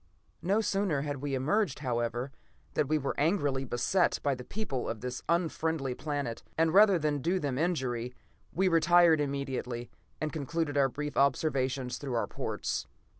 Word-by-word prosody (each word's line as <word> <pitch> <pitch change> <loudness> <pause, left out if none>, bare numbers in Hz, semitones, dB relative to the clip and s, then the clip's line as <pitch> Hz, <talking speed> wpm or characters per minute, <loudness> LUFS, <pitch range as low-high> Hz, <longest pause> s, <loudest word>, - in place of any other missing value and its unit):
"No 200 +5 +2
sooner 195 -9 0
had 145 -1 -3
we 140 0 -2
emerged, 155 +5 +1
however, 120 -1 -2 0.4
than 145 - +1
we 155 +2 +2
were 140 -2 -2
angrily 145 -5 +1
beset 135 +10 +1
by 140 - +2
the 125 -1 -6
people 140 - -3
of 110 - -4
this 125 0 -4
unfriendly 160 -5 0
planet, 145 -4 -3 0.2
and 165 0 +3
rather 200 -1 +7
than 150 -2 0
do 175 +7 +1
them 140 -5 -2
injury, 125 -8 -1 0.4
we 190 +2 +2
retired 165 -1 +5
immediately, 135 -4 -3 0.3
and 155 -1 -2
concluded 155 0 -2
our 140 -1 +4
brief 150 +1 -5
observations 135 -3 +1
through 135 -4 -3
our 115 -3 +1
ports. - - -3
145 Hz, 160 wpm, -30 LUFS, 130-165 Hz, 0.4 s, rather